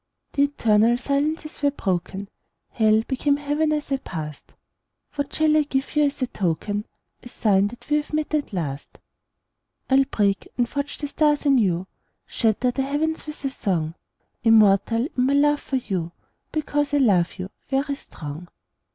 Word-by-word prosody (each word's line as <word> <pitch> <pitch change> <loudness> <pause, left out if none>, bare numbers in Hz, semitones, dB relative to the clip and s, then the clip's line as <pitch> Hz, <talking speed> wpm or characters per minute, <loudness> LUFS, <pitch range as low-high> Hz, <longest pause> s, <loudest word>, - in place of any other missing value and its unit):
The 280 - +4
eternal 230 -4 +3
silences 295 +4 -2
were 285 - +4
broken; 195 -5 -3 0.4
Hell 220 -1 +3
became 280 +2 +1
Heaven 295 +2 0
as 300 -2 -2
I 275 - +2
passed. 155 - -7 0.6
What 285 -1 -3
shall 310 -1 +3
I 310 - +5
give 275 0 -2
you 300 0 +4
as 280 -1 -1
a - - +3
token, 205 0 -2 0.4
A 245 - -11
sign 200 -4 +2
that 240 +3 -11
we 300 - +3
have 300 - -4
met, 310 0 -2
at 300 -5 0
last? 145 -7 -4 0.9
I'll 270 +1 +5
break 200 -5 0
and 245 -1 +2
forge 280 +2 -4
the 290 - -4
stars 295 0 +1
anew, 200 -11 +3 0.4
Shatter 230 +2 +1
the 270 - -2
heavens 305 +4 -1
with 300 -2 -7
a 270 - 0
song; 165 -10 -1 0.5
Immortal 225 +1 +5
in 250 - +2
my 270 +2 +2
love 295 +1 +4
for 270 - -4
you, 185 -9 -2 0.4
Because 290 -1 0
I - - +4
love 195 -10 +3
you, 185 +2 -6 0.2
very 275 +1 0
strong. 155 - -8
265 Hz, 165 wpm, -24 LUFS, 200-290 Hz, 0.9 s, I